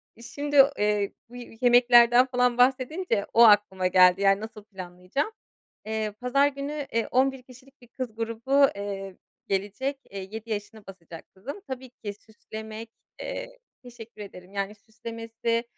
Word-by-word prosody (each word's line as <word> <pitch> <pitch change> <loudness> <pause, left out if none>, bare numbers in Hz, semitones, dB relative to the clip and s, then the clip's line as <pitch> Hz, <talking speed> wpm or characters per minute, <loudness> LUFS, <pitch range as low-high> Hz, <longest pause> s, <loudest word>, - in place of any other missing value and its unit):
İii, 230 - -15
şimdi, 285 +1 +3
eee, 210 -1 +1 0.2
bu 245 - -13
yemeklerden 240 0 +5
falan 250 -2 +1
bahsedince 255 - +1
o 235 - +7
aklıma 205 -4 +5
geldi. 180 +1 +5
Yani, 195 0 +3
nasıl 220 -1 -9
planlayacağım? 185 - -5 0.5
Eee, 220 -1 -2
pazar 275 +3 +3
günü, 285 +1 -5
eee, 230 0 0
11 265 0 +1
kişilik 255 +2 -18
bir 245 - -17
kız 240 -2 -6
grubu, 230 +5 +2
eee, 195 -1 -6 0.3
gelecek. 205 +8 -2
Eee, 195 -1 -7
7 220 +1 -8
yaşına 210 0 -5
basacak 170 -3 -11
kızım. 280 - -8
Tabii 260 0 -7
ki, 210 -4 -8
süslemek 220 +1 -10 0.3
eee, - - -6 0.2
teşekkür 230 -3 -12
ederim. 185 -1 -11
Yani, 200 +1 -3
süslemesi, 230 +1 -4
230 Hz, 140 wpm, -26 LUFS, 205-255 Hz, 0.5 s, o